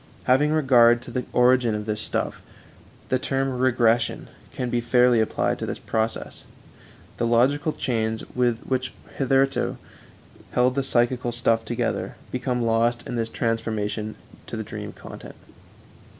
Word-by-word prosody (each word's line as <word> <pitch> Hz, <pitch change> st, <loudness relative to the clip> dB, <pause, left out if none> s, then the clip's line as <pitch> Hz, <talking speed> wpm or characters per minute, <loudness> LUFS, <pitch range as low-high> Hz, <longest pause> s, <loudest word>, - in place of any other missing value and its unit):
Having 145 Hz, +4 st, +3 dB
regard 125 Hz, -6 st, +5 dB
to -, -, -9 dB
the 125 Hz, -1 st, -2 dB
origin 125 Hz, -2 st, +4 dB
of 105 Hz, 0 st, -4 dB
this 105 Hz, 0 st, -2 dB
stuff, -, -, -3 dB, 0.7 s
the 130 Hz, -, +2 dB
term 135 Hz, +1 st, -1 dB
regression 120 Hz, -2 st, +2 dB, 0.2 s
can 125 Hz, -2 st, -3 dB
be 120 Hz, -, +1 dB
fairly 125 Hz, 0 st, +4 dB
applied 110 Hz, -, 0 dB
to -, -, -3 dB
this -, -, -3 dB
process. 110 Hz, 0 st, -3 dB, 0.7 s
The 115 Hz, -, 0 dB
logical 135 Hz, +6 st, +3 dB
chains 110 Hz, -5 st, -1 dB
which 125 Hz, +1 st, 0 dB, 0.3 s
hitherto 135 Hz, 0 st, +2 dB, 0.8 s
held 125 Hz, +1 st, +3 dB
the 140 Hz, -, 0 dB
psychical 120 Hz, -1 st, +1 dB
stuff 115 Hz, -1 st, +1 dB
together 120 Hz, +1 st, -2 dB, 0.2 s
become 125 Hz, -1 st, -1 dB
lost 115 Hz, +1 st, +1 dB
in -, -, -5 dB
this 115 Hz, -1 st, -1 dB
transformation 110 Hz, -2 st, -2 dB, 0.3 s
to -, -, -5 dB
the -, -, -3 dB
dream -, -, -7 dB
content. -, -, -11 dB
120 Hz, 135 wpm, -24 LUFS, 115-130 Hz, 0.8 s, regard